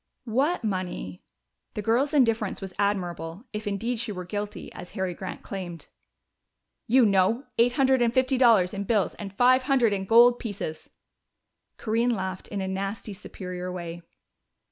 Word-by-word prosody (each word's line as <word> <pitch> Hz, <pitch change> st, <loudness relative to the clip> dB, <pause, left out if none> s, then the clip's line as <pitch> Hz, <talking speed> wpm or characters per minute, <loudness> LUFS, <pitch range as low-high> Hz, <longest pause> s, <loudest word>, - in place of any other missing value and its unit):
"What 265 Hz, +7 st, +1 dB
money?" 185 Hz, -, -3 dB, 0.5 s
The 210 Hz, -, -3 dB
girl's 260 Hz, +8 st, +2 dB
indifference 230 Hz, -6 st, +2 dB
was 190 Hz, -2 st, -7 dB
admirable, 180 Hz, -1 st, -2 dB
if 210 Hz, 0 st, -4 dB
indeed 225 Hz, +4 st, -2 dB
she 230 Hz, -2 st, -2 dB
were 180 Hz, -2 st, -6 dB
guilty, 205 Hz, +2 st, -5 dB
as 175 Hz, -, -9 dB
Harry 190 Hz, -1 st, -1 dB
Grant 190 Hz, +2 st, -7 dB
claimed. 180 Hz, -4 st, -7 dB, 1.0 s
"You 250 Hz, +1 st, +5 dB
know. 200 Hz, +5 st, +3 dB, 0.2 s
Eight 240 Hz, +1 st, +4 dB
hundred 265 Hz, -1 st, +3 dB
and 235 Hz, -1 st, +3 dB
fifty 260 Hz, +1 st, +2 dB
dollars 220 Hz, -8 st, +5 dB
in 200 Hz, 0 st, -3 dB
bills 205 Hz, -2 st, +1 dB
and 200 Hz, -2 st, -6 dB
five 250 Hz, +5 st, +4 dB
hundred 245 Hz, -6 st, +4 dB
in 195 Hz, -1 st, -2 dB
gold 240 Hz, +3 st, +6 dB
pieces." 195 Hz, -8 st, -5 dB, 0.9 s
Corinne 230 Hz, +2 st, +1 dB
laughed 190 Hz, -1 st, -4 dB
in 200 Hz, -2 st, -4 dB
a 190 Hz, -, -2 dB
nasty 195 Hz, +2 st, -4 dB
superior 180 Hz, -2 st, -6 dB
way. 175 Hz, -1 st, -6 dB
205 Hz, 155 wpm, -26 LUFS, 185-240 Hz, 1.0 s, gold